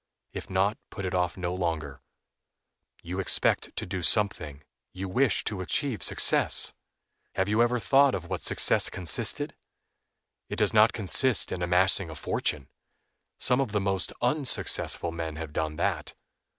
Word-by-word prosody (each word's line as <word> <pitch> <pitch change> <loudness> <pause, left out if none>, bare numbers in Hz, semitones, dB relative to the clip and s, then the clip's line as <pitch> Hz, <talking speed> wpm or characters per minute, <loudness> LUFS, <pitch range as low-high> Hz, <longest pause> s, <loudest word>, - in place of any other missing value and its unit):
If - - -7
not 95 +3 0
put 100 - -7
it 95 - -3
off 90 0 -1
no 90 -1 -3
longer. 80 -6 -4 1.0
You 90 +3 -5
expect 95 - 0
to - - -3
do 90 0 -4
something, 80 -6 0 0.3
you 95 +1 -5
wish 125 +7 +1
to 100 -4 -3
achieve 130 +5 -2
success. - - +2 0.6
Have 95 - 0
you 105 +3 +2
ever 120 +1 +2
thought 135 +3 +3
of 90 -2 -6
what 95 -1 -4
success - - +3
consisted? 90 -3 -1 0.9
It - - -4
does 105 -1 +1
not 110 +1 +5
consist 115 +2 +2
in 90 - -4
amassing 90 +1 +3
a 80 - -8
fortune; 70 -2 -2 0.7
some 125 +2 +2
of 110 -6 -3
the 105 - +1
most 95 -1 -2
unsuccessful 130 - +1
men 80 -2 -5
have 80 -1 -7
done 80 0 -2
that. - - -2
95 Hz, 150 wpm, -27 LUFS, 85-110 Hz, 1.0 s, not